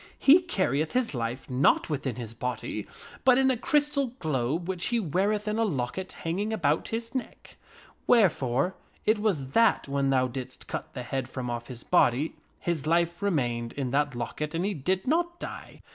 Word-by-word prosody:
He 310 Hz, +6 st, +7 dB
carrieth 160 Hz, -, 0 dB
his 250 Hz, -6 st, +1 dB
life 120 Hz, +1 st, -3 dB
not 130 Hz, +2 st, +3 dB
within 140 Hz, -5 st, -2 dB
his 115 Hz, -2 st, -6 dB
body, 125 Hz, +2 st, -4 dB, 0.4 s
but 255 Hz, -1 st, +6 dB
in 265 Hz, 0 st, +4 dB
a -, -, +1 dB
crystal 280 Hz, 0 st, +1 dB
globe 155 Hz, -, -1 dB
which 185 Hz, -2 st, -1 dB
he 240 Hz, -1 st, +1 dB
weareth 205 Hz, +4 st, 0 dB
in 210 Hz, +1 st, 0 dB
a -, -, +3 dB
locket 185 Hz, -, -2 dB
hang 165 Hz, +3 st, -1 dB
ing 210 Hz, +2 st, -1 dB
about 160 Hz, -8 st, +1 dB
his 230 Hz, +1 st, -4 dB
neck; 260 Hz, -, -6 dB, 0.5 s
wherefore 165 Hz, -, +3 dB, 0.3 s
it 215 Hz, 0 st, +3 dB
was 175 Hz, -12 st, 0 dB
that 230 Hz, +2 st, +3 dB
when 140 Hz, 0 st, 0 dB
thou 130 Hz, -1 st, +3 dB
didst 130 Hz, 0 st, -7 dB
cut -, -, -6 dB
the 125 Hz, -, -4 dB
head 130 Hz, +1 st, -3 dB
from 125 Hz, -2 st, -4 dB
off 120 Hz, 0 st, -4 dB
his 120 Hz, -2 st, -9 dB
body, 135 Hz, +6 st, +3 dB, 0.2 s
his 165 Hz, -4 st, -2 dB
life 170 Hz, +2 st, +2 dB
remained 120 Hz, -11 st, 0 dB
in 135 Hz, -3 st, -3 dB
that 145 Hz, -1 st, +1 dB
locket 150 Hz, +6 st, -4 dB
and 170 Hz, +3 st, 0 dB
he 205 Hz, -, 0 dB
did 185 Hz, +4 st, -1 dB
not 345 Hz, +4 st, 0 dB
die. -, -, -8 dB
160 Hz, 185 wpm, -28 LUFS, 130-215 Hz, 0.5 s, He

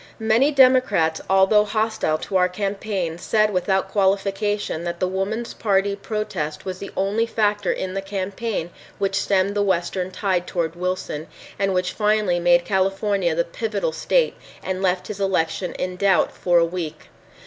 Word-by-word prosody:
Many 225 Hz, +5 st, +3 dB
Democrats 255 Hz, -, +4 dB
although 195 Hz, +2 st, +5 dB
hostile 215 Hz, -6 st, 0 dB
to 190 Hz, -, -6 dB
our 180 Hz, -1 st, +4 dB
campaign 195 Hz, -3 st, -3 dB
said 215 Hz, +2 st, +1 dB
without 190 Hz, +1 st, 0 dB
qualification 195 Hz, -2 st, 0 dB
that 170 Hz, 0 st, -4 dB
the 185 Hz, -, +1 dB
Woman's 200 Hz, +5 st, -3 dB
Party 200 Hz, -1 st, +1 dB
protest 200 Hz, -7 st, -4 dB
was 185 Hz, -1 st, -5 dB
the 200 Hz, -, -6 dB
only 205 Hz, +4 st, +1 dB
factor 205 Hz, -3 st, +1 dB
in 185 Hz, 0 st, -3 dB
the 195 Hz, -, -2 dB
campaign 195 Hz, -1 st, -3 dB, 0.3 s
which 195 Hz, +1 st, 0 dB
stemmed 195 Hz, 0 st, +1 dB
the 205 Hz, -, +2 dB
western 185 Hz, -1 st, 0 dB
tide 185 Hz, -2 st, -1 dB
toward 170 Hz, -2 st, -2 dB
Wilson, 180 Hz, -3 st, -3 dB, 0.3 s
and 195 Hz, -1 st, +1 dB
which 180 Hz, 0 st, 0 dB
finally 210 Hz, -4 st, +1 dB
made 175 Hz, 0 st, +4 dB
California 195 Hz, -2 st, +1 dB
the 170 Hz, -, +1 dB
pivotal 205 Hz, -1 st, -2 dB
state 475 Hz, -, +1 dB, 0.3 s
and 185 Hz, 0 st, -3 dB
left 185 Hz, -1 st, +1 dB
his 205 Hz, -1 st, -6 dB
election 180 Hz, -2 st, 0 dB
in 180 Hz, 0 st, -4 dB
doubt 190 Hz, -3 st, +3 dB
for 175 Hz, -1 st, +1 dB
a 170 Hz, -, +5 dB
week. 165 Hz, -3 st, -5 dB
195 Hz, 160 wpm, -22 LUFS, 180-205 Hz, 0.3 s, although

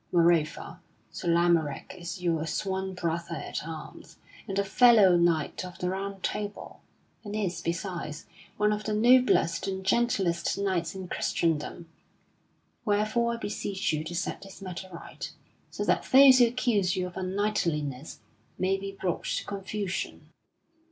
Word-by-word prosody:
Moreover, 170 Hz, -2 st, +2 dB, 0.3 s
Sir 175 Hz, -, -6 dB
Lamorack 170 Hz, -4 st, +2 dB
is 180 Hz, +1 st, -7 dB
your 165 Hz, -2 st, 0 dB
sworn 190 Hz, +2 st, -2 dB
brother 170 Hz, -1 st, -2 dB
at -, -, -5 dB
arms, 160 Hz, -2 st, -9 dB, 0.3 s
and 195 Hz, -2 st, -3 dB
a 200 Hz, -, +3 dB
fellow 205 Hz, -2 st, +6 dB
knight 170 Hz, -1 st, +1 dB
of 180 Hz, 0 st, -9 dB
the 180 Hz, 0 st, -2 dB
Round 195 Hz, 0 st, -5 dB
Table, 205 Hz, 0 st, -4 dB, 0.4 s
and 205 Hz, -1 st, -6 dB
is, 185 Hz, -5 st, -2 dB
besides, 170 Hz, -3 st, -4 dB, 0.3 s
one 210 Hz, 0 st, +3 dB
of 210 Hz, 0 st, -3 dB
the 215 Hz, -, 0 dB
noblest 235 Hz, -8 st, +4 dB
and 190 Hz, -1 st, -4 dB
gentlest 195 Hz, -6 st, +1 dB
knights 185 Hz, -4 st, -1 dB
in 190 Hz, -1 st, -6 dB
Christendom. 165 Hz, 0 st, -1 dB, 1.0 s
Wherefore 220 Hz, +2 st, +1 dB
I -, -, -6 dB
beseech 200 Hz, -5 st, -2 dB
you 155 Hz, 0 st, -1 dB
to 175 Hz, +2 st, -5 dB
set 180 Hz, -, -3 dB
this 195 Hz, 0 st, -12 dB
matter 185 Hz, -1 st, -7 dB
right, 170 Hz, -, -8 dB, 0.4 s
so -, -, -4 dB
that -, -, +2 dB
those 265 Hz, -1 st, +9 dB
who 240 Hz, -, +7 dB
accuse 230 Hz, -6 st, +1 dB
you 185 Hz, -, -1 dB
of 180 Hz, -, -7 dB
unknightliness 170 Hz, -8 st, -2 dB, 0.4 s
may 190 Hz, +1 st, +1 dB
be 195 Hz, 0 st, -6 dB
brought 180 Hz, -3 st, -2 dB
to -, -, -2 dB
confusion." 200 Hz, -1 st, -4 dB
190 Hz, 145 wpm, -28 LUFS, 170-205 Hz, 1.0 s, those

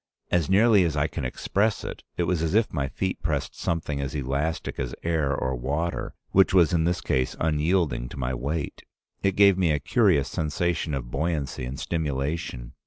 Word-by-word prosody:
As 85 Hz, -4 st, +2 dB
nearly 105 Hz, 0 st, +5 dB
as 80 Hz, -3 st, 0 dB
I 70 Hz, -, +2 dB
can 75 Hz, -2 st, -4 dB
express 100 Hz, -, 0 dB
it, -, -, -6 dB, 0.2 s
it 90 Hz, -, +1 dB
was 85 Hz, -1 st, 0 dB
as 80 Hz, +3 st, 0 dB
if 110 Hz, 0 st, +2 dB
my 70 Hz, -3 st, 0 dB
feet 95 Hz, +6 st, -3 dB
pressed 75 Hz, -3 st, -1 dB
something 75 Hz, -4 st, -2 dB
as 70 Hz, +1 st, -4 dB
elastic 70 Hz, +4 st, -2 dB
as 60 Hz, -1 st, -3 dB
air 80 Hz, -4 st, +1 dB
or 65 Hz, -2 st, -1 dB
water, 75 Hz, +7 st, -2 dB, 0.2 s
which 95 Hz, 0 st, +4 dB
was 90 Hz, -1 st, +5 dB
in 80 Hz, -2 st, +2 dB
this 85 Hz, 0 st, 0 dB
case 65 Hz, -5 st, 0 dB
unyielding 75 Hz, -5 st, +1 dB
to -, -, -9 dB
my 65 Hz, -1 st, -2 dB
weight. 70 Hz, +5 st, -3 dB, 0.4 s
It 95 Hz, -1 st, +1 dB
gave 100 Hz, -2 st, +6 dB
me 90 Hz, -3 st, +3 dB
a 75 Hz, -, +3 dB
curious 85 Hz, -, +3 dB
sensation 80 Hz, -1 st, -1 dB
of -, -, -5 dB
buoyancy 75 Hz, -5 st, -2 dB
and 65 Hz, +2 st, -6 dB
stimulation. 70 Hz, -5 st, -3 dB
80 Hz, 185 wpm, -26 LUFS, 70-85 Hz, 0.4 s, gave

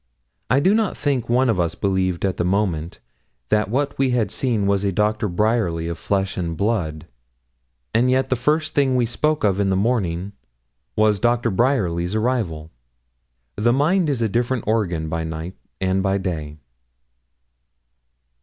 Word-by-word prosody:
I 130 Hz, +4 st, +4 dB
do 190 Hz, +8 st, +3 dB
not 220 Hz, -2 st, 0 dB
think 135 Hz, -5 st, -1 dB
one 125 Hz, +2 st, +3 dB
of 115 Hz, -6 st, +1 dB
us 85 Hz, -2 st, 0 dB
believed 95 Hz, -2 st, 0 dB
at 95 Hz, -, -1 dB
the -, -, 0 dB
moment 90 Hz, -4 st, -1 dB, 0.5 s
that 105 Hz, -2 st, +2 dB
what 140 Hz, +5 st, -1 dB
we 135 Hz, -1 st, +3 dB
had 120 Hz, -3 st, 0 dB
seen 115 Hz, -6 st, 0 dB
was 100 Hz, 0 st, +1 dB
a 100 Hz, -, +1 dB
Doctor 105 Hz, +2 st, 0 dB
Bryerly 90 Hz, -4 st, 0 dB
of 85 Hz, 0 st, -5 dB
flesh 95 Hz, -1 st, -1 dB
and 85 Hz, -3 st, -3 dB
blood, 85 Hz, -8 st, -1 dB, 0.9 s
and 120 Hz, +3 st, +3 dB
yet 130 Hz, +1 st, +1 dB
the -, -, +4 dB
first 155 Hz, +5 st, 0 dB
thing 135 Hz, -3 st, +2 dB
we 125 Hz, -1 st, +2 dB
spoke 150 Hz, +6 st, 0 dB
of 100 Hz, -2 st, +2 dB
in 100 Hz, -1 st, +1 dB
the 95 Hz, -, +2 dB
morning 95 Hz, -4 st, 0 dB, 0.6 s
was 105 Hz, -2 st, +3 dB
Doctor 120 Hz, 0 st, +1 dB
Bryerly's 95 Hz, -6 st, +1 dB
arrival. 110 Hz, -10 st, -1 dB, 0.9 s
The 120 Hz, +3 st, +3 dB
mind 160 Hz, +5 st, +2 dB
is 130 Hz, -5 st, 0 dB
a -, -, +2 dB
different 120 Hz, +2 st, -1 dB
organ 90 Hz, -8 st, 0 dB
by 80 Hz, +1 st, -2 dB
night 80 Hz, +3 st, -6 dB, 0.2 s
and 95 Hz, 0 st, +1 dB
by 95 Hz, 0 st, +1 dB
day. 80 Hz, -6 st, -4 dB
105 Hz, 165 wpm, -22 LUFS, 90-125 Hz, 0.9 s, I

